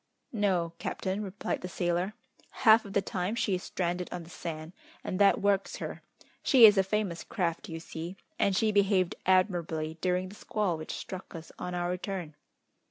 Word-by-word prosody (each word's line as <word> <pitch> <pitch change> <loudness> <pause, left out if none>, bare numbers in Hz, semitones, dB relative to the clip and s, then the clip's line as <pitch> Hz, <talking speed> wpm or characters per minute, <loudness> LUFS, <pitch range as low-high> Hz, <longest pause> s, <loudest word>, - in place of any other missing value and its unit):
"No, 185 -6 +1
captain," 190 +2 -2
replied 200 -1 -3
the 180 - -4
sailor. 175 +3 -1 0.5
"Half 220 0 +8
of 200 - -8
the 200 - +2
time 185 +3 -2
she 215 -4 0
is 180 - 0
stranded 180 -1 -2
on 175 -1 -5
the 165 - -13
sand, 160 0 -6 0.3
and 185 - -3
that 200 -1 +5
works 200 -1 +2
her. - - -6 0.4
She 250 -4 +8
is 210 -1 +8
a 195 - +5
famous 190 -4 -1
craft, 170 -5 -2
you 165 0 -5
see, 165 +3 -7 0.2
and 195 - +3
she 215 +2 +3
behaved 195 -3 +3
admirably 170 -4 +1
during 180 0 0
the 200 - -11
squall 210 -5 -1
which 155 0 -6
struck 185 -2 -8
us 165 -1 -9
on 180 0 -4
our 175 0 -1
return." 180 -3 -4
185 Hz, 180 wpm, -30 LUFS, 170-200 Hz, 0.5 s, Half